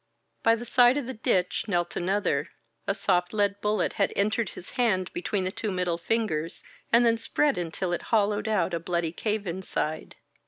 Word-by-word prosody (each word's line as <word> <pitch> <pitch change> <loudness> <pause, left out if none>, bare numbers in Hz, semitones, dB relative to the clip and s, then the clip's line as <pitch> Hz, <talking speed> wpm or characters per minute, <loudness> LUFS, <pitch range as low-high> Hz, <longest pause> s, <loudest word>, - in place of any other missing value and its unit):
By 225 0 +4
the 235 +1 -7
side 245 +2 +5
of 285 - -2
the 260 - -5
ditch 185 -5 0
knelt 175 -3 0
another, 180 -6 0 0.4
A 200 - +1
soft 180 -2 +1
lead 200 -1 +1
bullet 210 -2 0
had 200 - +3
entered 215 +1 +1
his 175 - -10
hand 210 -8 0
between 190 +2 -1
the 185 - -1
two 215 +1 -3
middle 180 -2 -1
fingers 170 -5 -1 0.3
and 235 +1 +6
then 230 -1 +3
spread 290 +5 +1
until 175 +1 -2
it - - -1
hollowed 210 -1 +2
out 190 -5 +1
a 170 - 0
bloody 170 -1 -1
cave 210 +3 -2
inside. 170 -3 -3
200 Hz, 185 wpm, -27 LUFS, 175-220 Hz, 0.4 s, and